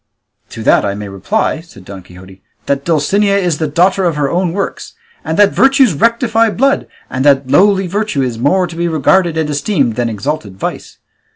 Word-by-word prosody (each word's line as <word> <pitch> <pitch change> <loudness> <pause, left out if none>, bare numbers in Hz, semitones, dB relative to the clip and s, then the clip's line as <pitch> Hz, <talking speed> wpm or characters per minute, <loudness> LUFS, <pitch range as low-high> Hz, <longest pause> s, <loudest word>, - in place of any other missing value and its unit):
"To 110 - -8
that - - +3
I 100 -1 -2
may 105 0 -7
reply," 155 - -2
said 105 - -17
Don 95 -1 -9
Quixote, 95 +2 -15 0.2
"that 140 0 -1
Dulcinea 200 +6 +1
is 175 -6 -1
the 155 - -1
daughter 180 +6 +1
of 170 -3 0
her 145 -2 -1
own 180 0 0
works, 195 +3 -5 0.3
and 160 0 -3
that 205 -1 +4
virtues 270 - +4
rectify 230 - +1
blood, 275 +6 0 0.2
and 130 0 -3
that 140 -2 +3
lowly 195 +4 +3
virtue 200 -6 -2
is 120 -3 -4
more 180 +9 +2
to 170 -1 -9
be 170 +1 -1
regarded 165 +2 +1
and 160 -2 0
esteemed 145 - -1
than 120 -1 0
exalted 105 -2 -4
vice. - - -6
160 Hz, 190 wpm, -14 LUFS, 130-195 Hz, 0.3 s, that